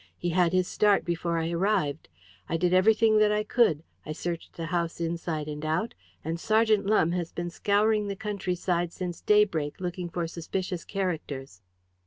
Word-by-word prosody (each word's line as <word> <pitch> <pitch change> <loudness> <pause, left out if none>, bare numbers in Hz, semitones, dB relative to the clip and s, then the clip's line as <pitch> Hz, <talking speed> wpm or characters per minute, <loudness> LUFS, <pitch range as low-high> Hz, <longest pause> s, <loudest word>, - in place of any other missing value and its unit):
"He 175 - -2
had 175 -1 +3
his 185 -1 +2
start 205 -2 +3
before 170 0 -1
I 165 +1 -1
arrived. 170 -5 0 0.4
I 165 - +1
did 175 +1 +1
everything 215 +3 +5
that 210 0 +4
I 210 0 +1
could. 210 -9 +2 0.2
I 155 - -5
searched 170 +1 -5
the 165 - -3
house 170 0 -2
inside 165 -2 -3
and 150 0 -6
out, 160 +10 -1 0.3
and 165 +1 -2
Sergeant 215 0 +2
Lumbe 175 -5 +3
has 175 -2 -2
been 175 0 -4
scouring 210 +2 +2
the 200 - -3
country 195 -3 -3
side 175 -1 -1
since 175 -2 -5
daybreak 190 -9 +2
looking 180 -1 -4
for 170 0 -2
suspicious 175 +2 -4
characters." 150 - -4
175 Hz, 175 wpm, -27 LUFS, 165-200 Hz, 0.4 s, everything